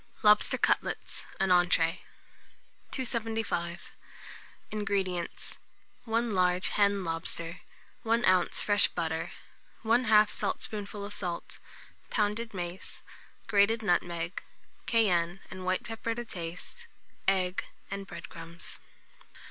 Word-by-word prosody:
LOBSTER 210 Hz, 0 st, +6 dB
CUTLETS -, -, 0 dB
(an 195 Hz, -2 st, +2 dB
Entree). 175 Hz, -1 st, +4 dB, 0.9 s
275. 225 Hz, -8 st, -1 dB, 0.8 s
INGREDIENTS. 195 Hz, -4 st, -2 dB, 0.5 s
1 230 Hz, 0 st, +1 dB
large 180 Hz, 0 st, +3 dB
hen 200 Hz, -1 st, +3 dB
lobster, 165 Hz, +1 st, -3 dB, 0.4 s
1 230 Hz, +1 st, +2 dB
oz. 185 Hz, -1 st, +3 dB
fresh 205 Hz, -1 st, +5 dB
butter, 160 Hz, 0 st, -2 dB, 0.5 s
1/2 220 Hz, -2 st, +5 dB
saltspoonful 205 Hz, -1 st, -2 dB
of 205 Hz, -, -6 dB
salt, 175 Hz, -4 st, -3 dB, 0.5 s
pounded 215 Hz, +2 st, 0 dB
mace, 180 Hz, -2 st, -6 dB, 0.4 s
grated 215 Hz, +2 st, +3 dB
nutmeg, 175 Hz, -2 st, 0 dB, 0.5 s
cayenne 180 Hz, -6 st, +3 dB
and 185 Hz, -1 st, -7 dB
white 185 Hz, 0 st, +1 dB
pepper 225 Hz, 0 st, -3 dB
to 240 Hz, 0 st, -4 dB
taste, 180 Hz, -, -7 dB, 0.4 s
egg, 185 Hz, -1 st, +2 dB, 0.3 s
and 195 Hz, 0 st, -4 dB
bread -, -, -8 dB
crumbs. 170 Hz, 0 st, -9 dB
195 Hz, 100 wpm, -30 LUFS, 175-220 Hz, 0.9 s, LOBSTER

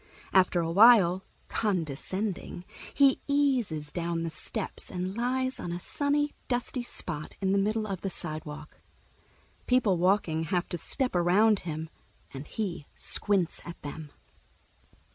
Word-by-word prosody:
After 185 Hz, -2 st, +4 dB
a 165 Hz, 0 st, -1 dB
while, 190 Hz, -3 st, +7 dB, 0.2 s
condescending, 185 Hz, 0 st, -2 dB, 0.3 s
he 275 Hz, -2 st, +4 dB
eases 250 Hz, -, +1 dB
down 170 Hz, -1 st, -2 dB
the 165 Hz, -, -3 dB
steps 215 Hz, +5 st, -5 dB
and 185 Hz, +1 st, -4 dB
lies 255 Hz, +2 st, 0 dB
on 175 Hz, -, -4 dB
a 175 Hz, -, -3 dB
sunny, 290 Hz, +7 st, 0 dB
dusty 245 Hz, 0 st, -1 dB
spot 170 Hz, -10 st, -4 dB
in 190 Hz, -1 st, +1 dB
the 200 Hz, -, +3 dB
middle 215 Hz, +2 st, 0 dB
of 195 Hz, -4 st, -4 dB
the 195 Hz, -, -2 dB
sidewalk. 155 Hz, -3 st, -5 dB, 0.9 s
People 235 Hz, -7 st, +3 dB
walking 175 Hz, -3 st, +2 dB
have 175 Hz, +2 st, 0 dB
to 175 Hz, -, -3 dB
step 255 Hz, -, -1 dB
around 195 Hz, +5 st, +4 dB
him, 160 Hz, -2 st, -5 dB, 0.5 s
and 135 Hz, +2 st, -7 dB
he 180 Hz, -9 st, -4 dB
squints 195 Hz, -5 st, 0 dB
at 170 Hz, -, -9 dB
them. 150 Hz, 0 st, -7 dB
185 Hz, 135 wpm, -29 LUFS, 165-225 Hz, 0.9 s, while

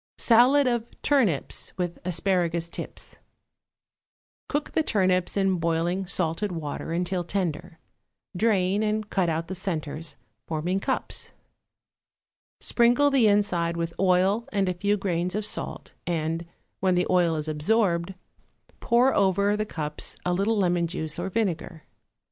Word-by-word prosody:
=Salad 255 Hz, +5 st, +5 dB
of 240 Hz, -2 st, -2 dB
Turnips 230 Hz, -, +1 dB
with 175 Hz, -2 st, -3 dB
Asparagus 175 Hz, -1 st, 0 dB
Tips.= -, -, -7 dB, 1.3 s
Cook 290 Hz, 0 st, -2 dB
the -, -, +2 dB
turnips 185 Hz, -, +1 dB
in 195 Hz, -2 st, +2 dB
boiling 170 Hz, +3 st, 0 dB
salted 180 Hz, +3 st, -1 dB
water 160 Hz, -2 st, -5 dB
until 175 Hz, +1 st, -1 dB
tender; 175 Hz, -3 st, -3 dB, 0.6 s
drain, 195 Hz, -1 st, +2 dB
and 215 Hz, 0 st, -1 dB
cut 185 Hz, -3 st, +1 dB
out 165 Hz, +1 st, -2 dB
the 190 Hz, -, -4 dB
centres, 165 Hz, -4 st, -4 dB, 0.3 s
forming 170 Hz, +4 st, -1 dB
cups. -, -, -2 dB, 1.3 s
Sprinkle 245 Hz, +4 st, +3 dB
the 260 Hz, -5 st, +4 dB
inside 180 Hz, -5 st, +1 dB
with 165 Hz, 0 st, -2 dB
oil 195 Hz, +6 st, +2 dB
and 200 Hz, -2 st, +1 dB
a 180 Hz, -, +1 dB
few 200 Hz, +4 st, 0 dB
grains 180 Hz, -1 st, -1 dB
of 210 Hz, 0 st, -1 dB
salt, -, -, -5 dB
and, 165 Hz, 0 st, -2 dB, 0.3 s
when 185 Hz, -1 st, +2 dB
the 180 Hz, -, +2 dB
oil 175 Hz, -3 st, +3 dB
is 155 Hz, 0 st, -3 dB
absorbed, 170 Hz, +3 st, +1 dB, 0.6 s
pour 245 Hz, +3 st, +3 dB
over 200 Hz, +1 st, +2 dB
the 215 Hz, 0 st, -2 dB
cups 150 Hz, -5 st, -4 dB
a 180 Hz, -, +1 dB
little 200 Hz, +5 st, +1 dB
lemon 175 Hz, -3 st, +2 dB
juice 160 Hz, -1 st, -4 dB
or 180 Hz, +2 st, -2 dB
vinegar. 180 Hz, -6 st, -2 dB
185 Hz, 135 wpm, -26 LUFS, 170-205 Hz, 1.3 s, =Salad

